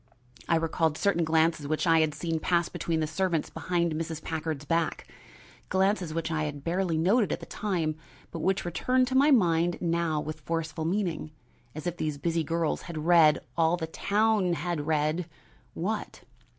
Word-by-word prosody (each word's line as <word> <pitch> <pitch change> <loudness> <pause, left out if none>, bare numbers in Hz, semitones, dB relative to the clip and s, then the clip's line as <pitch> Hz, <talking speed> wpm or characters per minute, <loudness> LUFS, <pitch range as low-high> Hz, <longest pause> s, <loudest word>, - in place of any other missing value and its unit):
I 170 - +4
recalled 160 -1 0
certain 200 -4 +2
glances 160 -2 +2
which 155 +3 0
I 165 -1 +5
had 155 -2 +1
seen 165 +1 -2
pass 170 +1 +1
between 165 -1 -2
the - - +1
servants 170 0 -1
behind 170 -2 -1
Mrs. 160 0 -3
Packard's 155 -2 -3
back, 165 +2 -1 0.6
glances 190 -2 +1
which 165 0 -2
I 155 -1 0
had 145 -2 -6
barely 170 0 0
noted 200 +7 +3
at - - -1
the - - -9
time, 170 -7 -2 0.4
but 165 - -5
which 190 +3 0
returned 255 +9 +1
to 260 - -2
my 280 +3 +5
mind 175 - +3
now 170 -2 0
with 155 +1 -5
forceful 160 0 -3
meaning; 175 -3 -1 0.5
and 155 - -7
if 175 -1 -2
these 155 -3 -2
busy 165 +3 0
girls 165 -1 -1
had 155 -2 -5
read, 165 -3 +6
all 165 +1 +3
the 165 - -3
town 205 +2 +1
had 170 -3 -3
read 155 +2 0 0.5
what? - - -3
165 Hz, 175 wpm, -28 LUFS, 155-175 Hz, 0.6 s, read